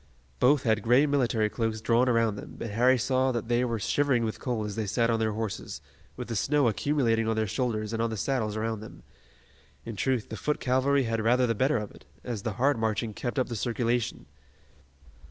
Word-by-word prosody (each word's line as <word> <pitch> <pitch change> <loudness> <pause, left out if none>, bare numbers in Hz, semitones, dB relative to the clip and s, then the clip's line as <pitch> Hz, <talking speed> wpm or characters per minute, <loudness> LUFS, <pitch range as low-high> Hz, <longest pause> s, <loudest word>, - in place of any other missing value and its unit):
Both 140 +2 +4
had 110 -2 +2
gray 125 +7 +4
military 125 -7 +1
cloaks 110 0 -2
drawn 120 +3 +2
around 115 -3 +2
them, 100 - -9
but 115 - -5
Harry 125 +4 +4
saw 130 +2 +1
that 120 -1 -4
they 120 +1 +2
were 115 -2 -1
shivering 125 +2 +1
with 110 - -4
cold 120 -4 -2
as 105 -1 -5
they 110 -2 -2
sat 115 +3 +1
on 115 - +1
their 110 -1 0
horses, 105 -9 -4 0.4
with 125 - -5
the 115 - -4
snow 140 +4 +2
accumulating 115 -2 +1
on 110 - +1
their 110 0 +1
shoulders 110 -1 -2
and 115 - -1
on 115 - +1
the 110 - -4
saddles 110 -2 -1
around 110 0 -2
them. 110 - -12 0.8
In 115 - -6
truth, 125 +3 -1
the 110 - -6
foot 150 - -1
cavalry 135 +2 +2
had 115 -1 -1
rather 125 +3 +3
the 115 - +1
better 130 +6 +1
of 105 -2 -5
it, - - -17 0.2
as 120 -5 -4
the 110 0 -3
hard 135 +3 +1
marching 110 0 -1
kept 120 +5 -4
up 130 - +1
the 120 - -5
circulation. 120 +1 -1
115 Hz, 215 wpm, -28 LUFS, 110-125 Hz, 0.8 s, Both